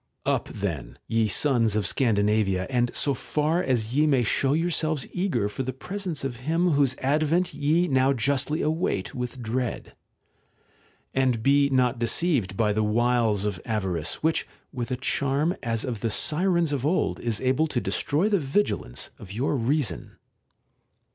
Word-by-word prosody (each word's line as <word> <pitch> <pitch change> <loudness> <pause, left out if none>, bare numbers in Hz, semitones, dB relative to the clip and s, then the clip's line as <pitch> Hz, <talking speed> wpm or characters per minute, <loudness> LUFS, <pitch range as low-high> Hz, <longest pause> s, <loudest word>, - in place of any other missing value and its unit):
Up - - 0
then, 85 -11 -5
ye 115 -1 +1
sons 115 -2 +2
of 105 -2 0
Scandinavia, 105 -5 +1
and 120 -1 +2
so 140 - +2
far 155 +5 0
as 120 -6 -1
ye 150 +2 +4
may 135 -4 +3
show 135 +5 +1
yourselves 160 -2 0
eager 180 - 0
for 105 +5 -5
the 130 0 -3
presence 180 +1 -4
of 130 -3 -3
him 165 +7 +1
whose 140 -3 +2
advent 155 +6 +1
ye 155 +5 +1
now 130 -2 +3
justly 140 +4 0
await 155 - -1
with 125 0 -5
dread. 120 +2 -3 1.2
And 130 -4 +1
be 140 +1 +4
not 125 -2 +1
deceived 120 - +1
by 105 -2 +2
the 110 - 0
wiles 110 -1 +1
of 95 -4 -3
avarice, 95 - -2
which 160 0 +1 0.3
witH 120 -3 -4
a 125 - -1
charm 140 +6 0
as 115 -2 -1
of 120 -5 -4
the 115 - -1
Sirens 170 - +1
of 135 -3 -2
old 160 +6 0
is 115 -3 -1
able 130 +5 +1
to - - -1
destroy 155 +8 0
the 205 -3 +2
vigilance 135 - -1
of 95 - -11
your 125 +8 -1
reason. 125 - -1
130 Hz, 160 wpm, -25 LUFS, 110-150 Hz, 1.2 s, ye